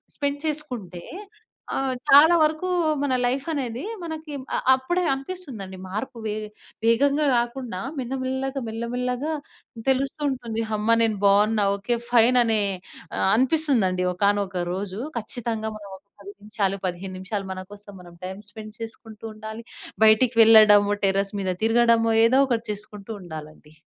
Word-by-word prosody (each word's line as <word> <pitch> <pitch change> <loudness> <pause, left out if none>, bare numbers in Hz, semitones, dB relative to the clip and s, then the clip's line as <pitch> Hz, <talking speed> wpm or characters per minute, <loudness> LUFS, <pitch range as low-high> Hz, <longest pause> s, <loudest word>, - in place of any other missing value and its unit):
Spend 285 0 -2
చేసుకుంటే, 245 - -5 0.7
ఆహ్, 270 -1 0 0.2
చాలా 310 +5 +8
వరకూ 310 +4 +1 0.3
మన 285 -2 0
లైఫనేది, 265 -1 -2 0.2
మనకి 315 -2 -6 0.2
అ - - +1 0.2
అప్పుడే 350 +8 0
అనిపిస్తుందండి 270 - -6
మార్పు. 215 +6 -5
వే 210 - -1 0.5
వేగంగా 280 +6 +3
గాకుండా, 240 -4 -2 0.2
మెన్నమెల్లగా, 265 +2 -3
మెల్లమెల్లగా 250 +6 -3 0.6
తెలుస్తూంటుంది. 265 -4 -1
హమ్మా! 215 +2 +2
నేను 220 -3 +2
బావున్నా. 205 +1 +4
ఓకే, 200 +4 -1 0.2
ఫైననే 235 -2 +5 0.6
ఆహ్, - - +1
అనిపిస్తుందండి 250 - +2
ఒకానొక 200 -1 0
రోజు. 195 +1 -5 0.2
ఖచ్చితంగా 225 -1 -4
మనం 205 -1 -11
ఒక 195 - -29 0.2
10 200 +1 -10
నిమిషాలు, 205 -2 -2
15 185 +1 -5
నిమిషాలు, 195 0 -4
మన 185 0 -7
కోసం 205 -1 -12
మనం 175 -1 -14
టైమ్ 190 +2 -7
స్పెండ్ 215 -1 -10
చేసుకుంటూ 225 -1 -9
ఉండాలి. 220 +1 -8 0.4
బయటికి 225 +2 +4
వెళ్ళడము, 215 -2 +7
టెర్రస్ 195 +1 0
మీద 190 -1 -1
తిరగడమో 230 0 +3
ఏదో 255 +4 +4
ఒకటి 230 -2 -1
చేసుకుంటూ 210 0 -9
ఉండాలండి. 155 -2 -10
225 Hz, 125 wpm, -24 LUFS, 200-260 Hz, 0.7 s, చాలా